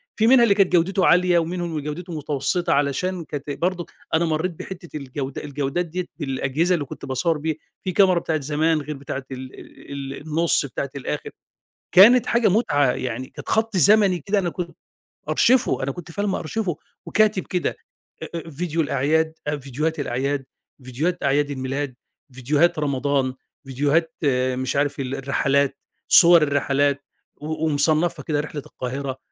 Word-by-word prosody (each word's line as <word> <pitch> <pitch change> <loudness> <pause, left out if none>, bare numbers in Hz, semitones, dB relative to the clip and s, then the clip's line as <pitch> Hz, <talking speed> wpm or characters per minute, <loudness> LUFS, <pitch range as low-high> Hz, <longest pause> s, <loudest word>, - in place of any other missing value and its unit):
في 220 - +2
منها 250 0 +7
اللي 205 -4 +4
كانت 195 -2 +3
جودته 180 +2 +3
عالية، 180 0 +4
ومنهم 170 +1 -3
اللي 155 -2 -3
جودته 165 +5 -6
متوسطة 145 +4 0
علشان 155 +6 0
كانت 145 -1 -6
برضه 175 +4 -2 0.3
أنا 165 +2 +3
مرّيت 160 +3 -1
بحتة 175 -4 -8
الجودة 135 0 -5
الجودات 145 +4 -2
ديّة 175 +2 -4
بالأجهزة 145 +3 0
اللي 150 -4 -3
كنت 135 - -9
باصوّر 145 +5 0
بيها، 155 +1 -2 0.3
في 185 - -2
كاميرا 185 -1 +4
بتاعة 160 -2 -2
زمان، 155 +2 +1
غير 150 +1 -6
بتاعة 135 0 -5
ال 130 0 -7
ال - - -14 0.2
ال - - -9
النُصّ 160 -1 +2
بتاعة 140 +1 -4
الآخر، 140 - -4 0.7
كانت 230 +6 +8
حاجة 235 -1 +3
متعة، 145 - +2
يعني 125 +1 -4
كانت - - -10
خط 220 -2 +1
زمني 200 -1 +5
كده 200 +7 0
أنا 180 -3 -1
كنت 170 0 -6 0.5
مأرشفه 250 - +3
أنا 135 - -1
كنت 170 +4 -9
فعلًا 205 +4 -2
مأرشفه 185 -1 -2 0.3
وكاتب 210 -2 +2
كده، 180 - -2 0.6
آآ 165 0 -6
فيديو 165 +2 -2
الأعياد، 155 +3 +1 0.3
فيديوهات 150 +4 -3
الأعياد، 135 +1 -2 0.4
فيديوهات 145 +8 -2
أعياد 145 +1 +1
الميلاد، 135 0 -3 0.4
فيديوهات 145 +6 +1
رمضان، 140 -2 0 0.3
فيديوهات 145 +5 0 0.4
مش 130 +1 -2
عارف 145 0 0
ال 135 0 -3
الرحلات، 140 0 +1 0.3
صور 170 -1 +8
الرحلات، 140 0 +1 0.3
و 155 +1 -3
ومصنّفها 155 +1 +1
كده، 150 0 -1
رحلة 150 -1 -5
القاهرة، 130 +1 -5
155 Hz, 155 wpm, -23 LUFS, 140-175 Hz, 0.7 s, كانت